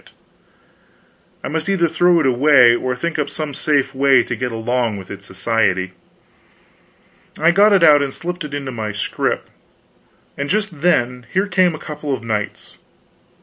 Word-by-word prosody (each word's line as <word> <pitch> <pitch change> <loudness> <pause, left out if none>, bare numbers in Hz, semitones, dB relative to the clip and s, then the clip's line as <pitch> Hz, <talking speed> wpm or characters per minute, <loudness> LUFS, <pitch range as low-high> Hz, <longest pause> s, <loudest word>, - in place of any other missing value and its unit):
Yet - - -21 1.3
I - - -4
must 160 +5 -3
either 185 -4 +2
throw 175 +2 +3
it 155 - 0
away 130 -1 +5
or 125 +1 -2
think 160 +5 -3
up 145 - -1
some 155 -2 -5
safe 140 -1 0
way 135 -2 +4
to 120 - -4
get 125 +2 -3
along 115 -1 -1
with 95 -2 -10
its 100 -1 -10
society. 95 -2 -1 1.5
I 165 +3 +3
got 205 +4 +4
it 195 -4 +4
out 150 -3 +6
and 140 -1 -2
slipped 175 +4 -6
it 145 -1 -6
into 140 -2 -5
my 110 -3 -5
scrip, 105 - -2 0.9
and 140 0 -4
just 205 -7 -2
then 125 -7 0
here 190 +2 +1
came 185 -3 +1
a - - -7
couple 150 -1 -6
of 115 - -11
knights. 105 -3 -5
140 Hz, 170 wpm, -18 LUFS, 120-165 Hz, 1.5 s, out